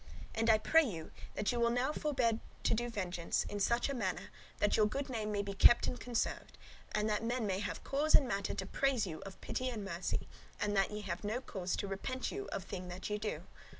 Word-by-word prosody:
And 225 +1 +1
I 220 - +8
pray 320 +9 +5
you, 170 - -4 0.2
that 205 - +1
ye 240 - -1
will 235 0 +4
now 250 +5 +1
forbear 255 -8 +1 0.2
to - - +3
do 240 +2 0
vengeance, 180 -6 -1
in 205 - -4
such 235 +4 +2
a 280 - -2
manner, 195 -8 -2 0.3
that 205 - +3
your 215 -1 +5
good 275 +6 -3
name 215 -3 -2
may 205 -1 0
be 200 0 -4
kept 240 +4 +7
and 250 - -2
conserved, 240 -2 -2 0.3
and 210 0 +1
that 210 0 0
men 235 0 0
may 190 -2 0
have 205 - -4
cause 295 +3 +3
and 270 - +6
matter 200 -4 -1
to 190 - -3
praise 260 +1 +1
you 160 -4 -6
of 190 - -10
pity 255 0 -2
and 215 -5 -4
of 180 - -3
mercy; 170 +2 -2 0.3
and 205 0 0
that 195 -1 +3
ye 210 0 -4
have 185 -2 -4
no 215 +4 -1
cause 190 -8 -3
to 200 - -3
repent 250 +7 -3
you 400 0 -4
of 195 - -3
thing 185 -1 -6
that 180 +3 -5
ye 210 - 0
do. 215 0 -3
215 Hz, 240 wpm, -35 LUFS, 195-245 Hz, 0.3 s, I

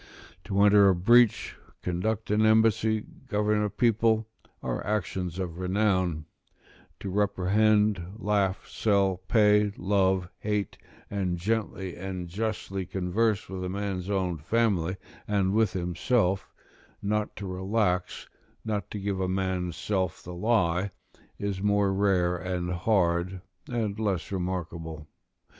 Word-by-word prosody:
To 100 - -1
enter 100 -1 +7
a 95 - +4
breach, 120 +5 +4 0.3
conduct 105 +5 -2
an 105 +1 +3
embassy, 110 0 +3 0.2
govern 105 -2 +1
a 105 - 0
people, 110 +1 +2 0.4
are 60 -1 -2
actions 95 -4 -2
of 90 -2 -4
renown; 95 -4 +1 0.8
to 95 - -4
reprehend, 105 -1 +2
laugh, 100 -3 0
sell, 100 -3 +1
pay, 105 -1 +4
love, 95 -2 +1
hate, 105 -2 -2 0.3
and 95 -3 -1
gently 95 -1 -2
and 90 -1 -5
justly 95 0 -3
converse 100 +3 0
with 95 -1 -5
a 90 - -3
man's 95 -1 -3
own 95 -5 -1
family 95 -1 +1 0.3
and 100 -2 +1
with 110 -3 +2
himself; 90 +3 0 0.5
not 105 +1 -1
to 100 - -6
relax, 95 0 -1 0.4
not 105 -2 -2
to 105 - -5
give 100 -1 -2
a 95 - 0
man's 95 -2 -1
self 95 -4 -2
the 90 - -8
lie, 95 -2 +1 0.5
is 100 -2 -3
more 100 -1 +2
rare 95 -3 +2
and 90 0 -3
hard, 90 -1 +1 0.3
and 110 -4 -2
less 100 -6 -1
remarkable. 85 -4 -4
95 Hz, 125 wpm, -27 LUFS, 90-105 Hz, 0.8 s, enter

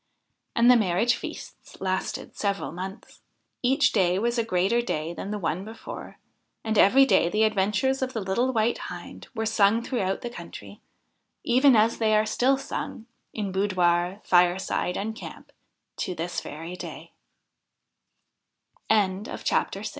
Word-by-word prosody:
And 235 +1 +6
the - - +7
marriage 215 +2 +2
feasts - - -9
lasted 190 0 -3
several 200 -1 -2
months. 185 +3 -8 0.4
Each 265 +2 +3
day 185 -3 +2
was 235 +3 0
a - - +2
greater 205 +3 +1
day 165 -8 -3
than 195 - -6
the 210 - -2
one 180 -1 -2
before; 220 +2 -9 0.5
and 220 -1 -1
every 260 +7 +6
day 170 -9 +3
the 215 +4 +2
adventures 215 +6 +1
of 260 0 -2
the 225 - -2
little 215 +6 0
White 230 -1 +1
Hind - - -9
were 225 -1 -1
sung 220 +1 +3
throughout 195 -7 -2
the 240 - -4
country, - - -10 0.6
even 255 +2 +5
as 220 +1 +3
they 215 -1 +3
are 215 0 +3
still 255 +5 +2
sung, 250 -4 -6 0.3
in 205 -3 -3
boudoir, 185 -1 +1
fireside, 180 0 +2
and 220 +2 -3
camp, - - -10 0.5
to 180 - -3
this 170 +2 -3
v 165 +4 -8
210 Hz, 140 wpm, -26 LUFS, 185-235 Hz, 0.6 s, the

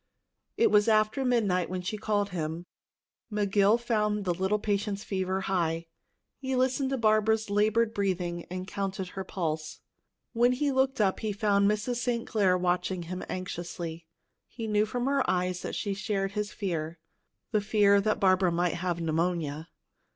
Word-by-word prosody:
It - - +4
was 210 +1 +5
after 215 +4 +3
midnight 210 -8 +1
when 185 0 -4
she 185 - -3
called 205 -1 0
him. 165 -1 -4 0.7
McGill 205 +1 +3
found 210 -3 0
the 180 - +1
little 190 +4 0
patient's 205 -1 -2
fever 190 -1 -2
high. 170 -3 -1 0.5
He 265 -1 -2
listened 260 +1 +1
to 270 - -1
Barbara's 215 -1 +2
labored 215 +2 +2
breathing 180 -4 -2
and 185 +1 -5
counted 190 -2 -3
her 190 0 -5
pulse. 160 -4 -3 0.5
When 240 +1 +4
he 280 +3 0
looked 265 -1 +1
up, 195 -3 +2
he 215 -2 -2
found 200 -1 +2
Mrs. 210 +4 -1
St. 240 -1 -1
Clair 190 -4 +2
watching 180 0 0
him 180 +2 -5
anxiously. 170 -2 -5 0.4
He 230 - -7
knew 210 0 +2
from 245 +2 -2
her 275 0 +2
eyes 180 0 0
that - - -4
she 200 - -2
shared 195 -1 -2
his 210 +1 -3
fear 170 -5 -3 0.5
the 215 -3 +2
fear 200 -1 +4
that 215 +1 0
Barbara 185 -2 +4
might 175 0 +1
have 175 -1 -2
pneumonia. 165 -1 -1
200 Hz, 160 wpm, -28 LUFS, 180-215 Hz, 0.7 s, was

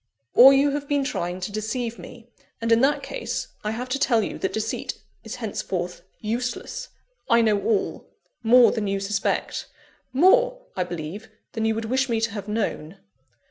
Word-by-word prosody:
"Or 260 +3 +10
you 275 +1 +4
have 285 0 -3
been 285 -1 +1
trying 180 -9 -3
to 185 - -4
deceive 225 +2 -3
me; 235 -1 -12 0.3
and 230 0 -1
in 230 +1 +5
that 280 +2 +2
case, - - -4
I 210 - -1
have 240 +4 -3
to 275 +2 -1
tell 230 -5 +3
you - - -5
that 190 - -1
deceit 220 0 -3 0.3
is 225 +2 -6
henceforth 185 -7 -4 0.2
useless. 245 - -3 0.4
I 235 0 +5
know 210 -3 +2
all 210 0 -1 0.3
more 240 +1 +6
than 215 -3 -2
you 195 0 0
suspect: 195 0 -1 0.4
more, - - +4
I 180 - 0
believe, 175 +5 -6 0.2
than 220 -1 -2
you 220 0 +1
would 225 0 -3
wish 260 +3 0
me 230 -1 +1
to 225 -1 0
have 200 -1 -6
known." 200 -5 -3
225 Hz, 180 wpm, -24 LUFS, 205-255 Hz, 0.4 s, Or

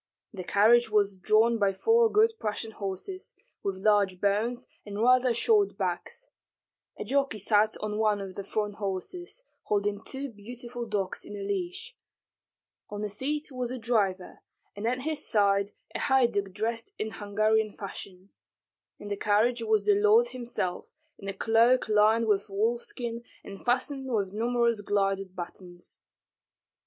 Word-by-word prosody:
The 190 -3 -6
carriage 225 +5 +4
was 205 -2 +2
drawn 220 +5 +3
by 200 -1 +2
four 455 - +3
good 445 +2 +4
Prussian 220 +1 -3
horses, 205 - -6 0.3
with 195 -1 -3
large 200 -3 +3
bones 225 +6 0 0.2
and 205 0 -6
rather 255 +2 +4
short 405 - +2
backs; - - -4 0.7
a - - -4
jockey 275 +1 0
sat 210 +1 +2
on 210 0 -3
one 215 -2 +2
of 195 -1 -6
the 200 - -6
front 210 0 -3
horses, 225 - -5 0.2
holding 205 0 -1
two 270 +1 -5
beautiful 240 +3 -7
dogs 200 -3 -2
in 205 - -9
a 200 - -5
leash; 200 - -4 0.9
on 205 0 -5
the 210 - -2
seat 290 +8 -2
was 250 -2 -3
a 255 - -4
driver, 205 -6 -1 0.4
and 205 +2 -3
at 250 +2 0
his 310 +1 -1
side 200 -2 +2 0.2
a - - -3
haiduk 235 -8 +2
dressed 225 +3 -3
in 215 0 -3
Hungarian 215 +1 +1
fashion; 195 -2 -9 0.7
in 205 - -10
the 205 - -2
carriage 220 +4 +2
was 220 -2 +1
the 210 - +5
lord 210 +4 +4
himself, 240 -7 -4 0.3
in 195 - -9
a 195 - -2
cloak 230 +5 +3
lined 215 +2 +4
with 205 -2 +1
wolfskin 235 +3 -2 0.2
and 195 - -10
fastened 265 +2 -1
with 200 -4 -1
numerous 235 0 +1
gilded 195 -2 -1
buttons. 175 0 -9
215 Hz, 150 wpm, -28 LUFS, 200-240 Hz, 0.9 s, the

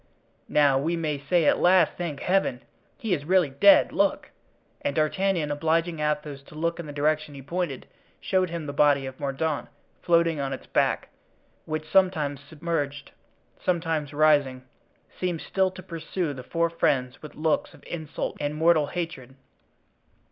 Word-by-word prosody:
now 140 -3 +4
we 165 +5 0
may 155 -4 -2
say 160 +4 +1
at - - +4
last, 180 -2 +5
thank 165 -5 -4
Heaven! 180 -9 +1 0.3
he 220 -5 -1
is 145 -5 -1
really 175 -2 +3
dead. 200 +9 +6
Look!" 200 -1 0 0.5
and 140 - -2
D'Artagnan, 160 0 +1
obliging 165 +2 0
Athos 150 -2 -2
to - - -14
look 170 +2 -1
in 170 - -6
the - - -6
direction 150 +1 0
he 135 - -9
pointed, 165 -2 -3 0.3
showed 185 -1 +1
him 165 -2 -5
the 145 - -5
body 145 -1 +3
of 130 0 -8
Mordaunt 145 +2 -2 0.3
floating 170 -2 +2
on 135 -1 -2
its 130 - -8
back, - - 0 0.6
which, 155 0 -4
sometimes 155 -6 +2
submerged, 145 -2 -4 0.5
sometimes 165 -5 -1
rising, 145 -4 +3 0.6
seemed 180 -3 -1
still 190 -1 +1
to 185 0 -11
pursue 165 -2 -3
the 130 - -8
four 170 +5 -1
friends 130 -6 0
with 150 - -10
looks 155 0 0
of - - -19
insult 160 -3 -5
and 145 +1 -2
mortal 160 -1 +3
hatred. 165 -8 -5
155 Hz, 155 wpm, -26 LUFS, 145-170 Hz, 0.6 s, dead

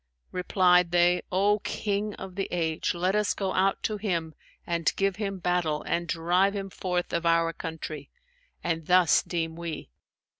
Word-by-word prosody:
Replied 180 -1 +3
they, 175 +1 +3
'O 200 +3 +3
King 205 0 -2
of 190 -1 -8
the 195 +1 -2
age, 165 -1 -1
let 185 +3 +1
us 210 -1 +1
go 195 -2 -2
out 190 +1 +1
to 215 - -1
him 170 -6 -2 0.3
and 170 -1 +1
give 195 0 0
him 200 -2 -3
battle 175 -4 0
and 170 0 -1
drive 175 +5 +2
him 195 -1 -4
forth 180 -1 -2
of 170 - 0
our 165 0 +2
country; 155 -3 -6 0.5
and 165 -2 -2
thus 180 -4 +5
deem 165 -2 -3
we.' 165 - -6
180 Hz, 160 wpm, -27 LUFS, 165-195 Hz, 0.5 s, thus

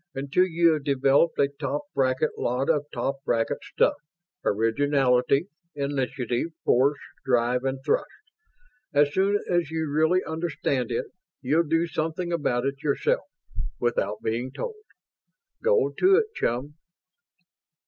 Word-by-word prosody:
Until 140 +7 +2
you 170 -1 +3
have 150 -2 -3
developed 140 +3 +3
a 140 - +4
top 140 0 -4
bracket 130 +2 +1
lot 125 +5 0
of 145 -2 -1
top 135 0 -2
bracket 115 -4 0
stuff - - +2 0.5
originality, 125 - +2 0.3
initiative, 135 -2 -1 0.2
force, 140 +4 +3 0.3
drive, 125 0 +1
and 135 0 -1
thrust. 145 - +1 0.9
As 145 0 +4
soon 195 +2 +3
as 175 -4 +1
you 160 -1 -2
really 160 +5 +2
understand 160 -6 -2
it, 115 - -1 0.4
you'll 155 +5 +2
do 165 +2 +2
something 165 +2 -3
about 130 -6 0
it 140 0 -3
yourself, 145 -3 0 0.5
without 105 -4 -1
being 120 +3 -1
told. 435 - -6 0.8
Go 475 -1 +3
to 380 +1 +6
it, 440 +2 +3
chum." 130 +5 -2
140 Hz, 130 wpm, -26 LUFS, 130-160 Hz, 0.9 s, to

